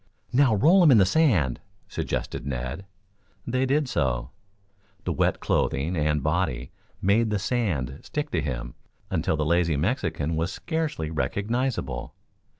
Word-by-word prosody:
"Now 130 -3 +4
roll 165 - +5
him 170 - +7
in 125 - +7
the 95 - +6
sand," 95 - +2 0.3
suggested - - -3
Ned. 65 +7 -4 0.6
They 130 +2 0
did 145 +2 +2
so. 60 - -1 0.7
The - - -1
wet - - +1
clothing 75 +7 0
and 75 -2 +1
body 75 -6 -1 0.3
made 110 +4 +3
the 105 - +1
sand 90 - -1
stick 150 0 -4
to 80 - 0
him - - -4 0.4
until 80 - 0
the 75 - 0
lazy 85 -1 +2
Mexican 80 - -1
was 80 +3 -1
scarcely 155 - -3
recognizable. 100 - -2
85 Hz, 140 wpm, -26 LUFS, -, 0.7 s, him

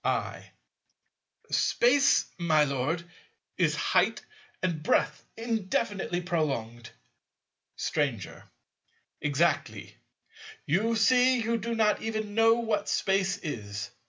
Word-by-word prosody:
I. - - -2 1.0
Space, 275 +4 +3
my 155 -3 +3
Lord, 145 +4 -1 0.6
is - - +2
height - - +1 0.4
and 170 -4 -1
breadth - - +1
indefinitely 205 -5 -2
prolonged. 135 -10 -3 0.9
Stranger. 135 - -3 0.8
Exactly: 145 - -1 0.7
you 215 +9 +1
see 255 +2 +4
you 230 0 -1
do 230 +2 -3
not 215 -2 +2
even 215 -2 -3
know 225 +1 +5
what 220 -3 -1
Space 195 0 +1
is. 105 - -5
185 Hz, 95 wpm, -28 LUFS, 145-225 Hz, 1.0 s, know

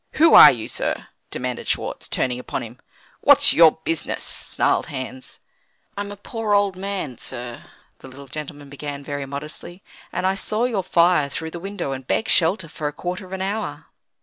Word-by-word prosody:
"Who 325 +1 +5
are - - +11
you, 115 -4 -5
sir?" - - -3 0.2
demanded 125 -1 -4
Schwartz, - - -3
turning 125 -1 -1
upon 125 - -4
him. 120 +2 -11 0.4
"What's - - +7
your 165 -2 +7
business?" 165 -2 -2
snarled - - 0
Hans. 130 -1 -7 0.6
"I'm 205 0 -4
a 205 - -8
poor, 215 0 -1
old 200 -2 +2
man, 185 - -4
sir," 120 -1 -6 0.3
the - - -12
little 135 +2 -11
gentleman 145 +1 -7
began 140 0 -7
very 145 -1 -5
modestly, 150 +6 -8 0.3
"and 180 - -2
I 190 - +3
saw 215 +3 -2
your 235 -6 0
fire 170 -4 +3
through 160 +3 -5
the 170 - -7
window, 195 -5 -4
and 130 -1 -6
begged 220 - 0
shelter 170 +1 +2
for 155 -2 -4
a - - -2
quarter 180 +4 -5
of - - -17
an 190 0 -3
hour." 205 +3 -4
160 Hz, 180 wpm, -22 LUFS, 135-195 Hz, 0.6 s, are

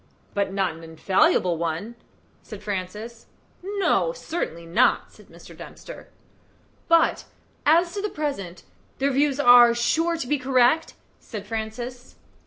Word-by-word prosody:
"But 200 -2 -1
not 190 -3 -1
an 165 +1 -13
infallible 180 - +1
one?" 170 +7 -3 0.5
said 210 -4 -11
Francis. 210 +4 -6 0.3
"No; 400 +5 0
certainly 310 - -5
not," 165 +1 +2
said - - -19
Mr. - - -15
Dempster. - - -11 0.8
"But, 335 -1 +3 0.4
as 340 +3 +4
to 405 - -3
the 420 - -2
present, 200 - -5 0.3
their 275 +1 0
views 280 +1 +1
are 245 -3 +7
sure 330 +8 +1
to 320 - -4
be 295 +2 0
correct?" 260 +4 +2 0.2
said 210 -3 -8
Francis. 230 +3 -6
240 Hz, 130 wpm, -24 LUFS, 195-305 Hz, 0.8 s, are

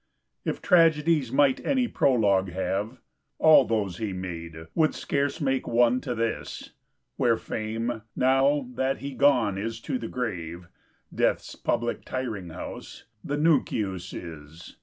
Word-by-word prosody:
If - - -3
Tragedies 160 - +4
might 135 -1 +3
any 260 -3 +1
Prologue 100 - +2
have, 100 +6 -2 0.4
All 155 -4 +7
those 105 -6 -1
he 105 -4 -3
made, 85 -3 -6
would 155 -2 +2
scarce 140 0 -1
make 135 -3 0
one 120 +1 +3
to 120 - -3
this: 115 0 -3 0.5
Where 115 -2 +3
Fame, 110 +1 -3
now 135 +1 +3
that 130 +2 0
he 140 0 -6
gone 110 -9 +3
is 115 +2 -4
to 255 - -3
the - - -5
grave 90 -8 -4 0.5
(DeathŌĆÖs - - -1
public 120 0 -1
tiring 110 -9 -4
house), 80 - -8 0.2
the 145 - -2
Nuncius 105 - +1
is. 80 0 -10
115 Hz, 135 wpm, -26 LUFS, 95-140 Hz, 0.5 s, All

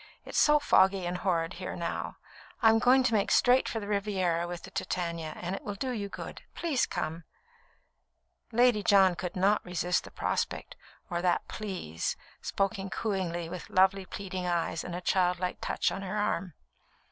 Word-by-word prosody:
It's - - -1
so 300 0 +6
foggy 190 -9 +4
and 180 +1 -2
horrid 165 -4 0
here 185 - -4
now; 170 -1 -4 0.5
I'm 225 0 +6
going 255 +2 +5
to 250 - +1
make 205 -2 +2
straight 250 +1 +4
for 225 - -2
the 205 - -6
Riviera 190 -5 0
with 175 -1 -6
the - - -10
Titania, 170 -3 -3
and 180 +2 -3
it - - -7
will 205 - -4
do 255 +6 -2
you 205 -4 -3
good. - - -7
Please 305 -8 +1
come." 165 +2 -3 1.3
Lady 240 -2 +4
John 195 -2 +5
could 175 0 -5
not 195 +3 +3
resist 180 0 0
the - - -10
prospect, - - -2 0.4
or 175 0 -1
that 180 -1 +1
"Please," 185 - -4 0.3
spoken 195 0 -1
cooingly, 185 -6 -2
with 175 +1 -7
lovely, 190 0 +3
pleading 185 -2 -4
eyes 170 -1 -1
and 175 - -5
a 180 - -4
childlike 180 0 +1
touch - - 0
on - - -4
her 195 +2 -3
arm. 185 -5 -1
190 Hz, 170 wpm, -30 LUFS, 175-210 Hz, 1.3 s, so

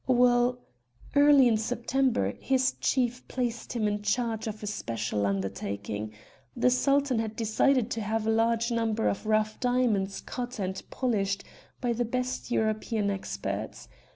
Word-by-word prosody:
"Well, 245 -1 +4 0.6
early 285 -2 +7
in 225 -2 +3
September, 240 - 0
his 260 -1 +2
chief 250 -1 0
placed 240 -2 -3
him 225 -3 0
in 205 0 -1
charge 225 +1 -1
of 215 0 -6
a - - -2
special 115 - -2
undertaking. 100 +2 -3 0.5
The 250 +1 +4
Sultan 275 -1 +2
had 220 -1 -3
decided 235 +2 +2
to 225 - -2
have 215 +1 -1
a 225 - +2
large 230 +1 +2
number 225 -1 0
of 205 - -2
rough 215 0 +1
diamonds 240 -6 +1
cut 250 0 -5
and 190 -2 -3
polished 200 -6 -1 0.4
by 245 -2 +1
the 240 +1 0
best 250 +2 -3
European 215 -2 0
experts. 100 - -4
225 Hz, 145 wpm, -28 LUFS, 205-250 Hz, 0.6 s, early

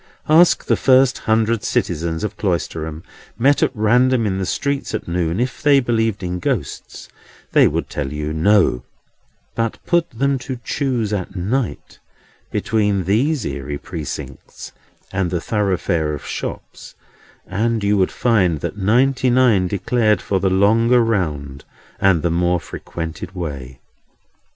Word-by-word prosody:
Ask 165 +3 +5
the - - +2
first 130 -1 +4
hundred 110 0 +2
citizens 80 +2 -1
of 105 -1 -3
Cloisterham, 80 -5 -3 0.3
met 140 +4 +3
at - - +3
random 120 +3 +3
in 95 -2 -1
the 95 - -2
streets 140 -4 -2
at - - -5
noon, 85 +1 -1
if 125 +1 -2
they 145 -2 +5
believed 115 -5 0
in 90 0 -3
Ghosts, 105 - -4 0.4
they - - +5
would - - -2
tell 70 -2 -4
you 75 +1 -3
no; 85 - +3 0.7
but 115 -1 -2
put 170 -1 +1
them 135 +3 0
to 125 +1 -6
choose 120 -7 -1
at 95 -1 -4
night 100 - -3 0.5
between 105 -3 0
these 120 - +1
eerie 70 +1 -4
Precincts 80 -1 -8 0.4
and 95 -2 -1
the 90 - -1
thoroughfare 85 -6 -1
of 75 - -10
shops, - - -7 0.5
and 110 +4 -1
you 100 +1 +2
would 95 -2 +2
find 95 -10 +1
that - - -4
ninety 125 +6 +2
nine 120 -7 +3
declared 105 +3 +1
for 95 - -1
the 95 - +1
longer 115 +6 +4
round 75 -11 -2 0.4
and 95 -5 +3
the 85 - +1
more 90 +1 +1
frequented 85 +3 -7
way. 70 -7 -6
100 Hz, 140 wpm, -19 LUFS, 85-120 Hz, 0.7 s, Ask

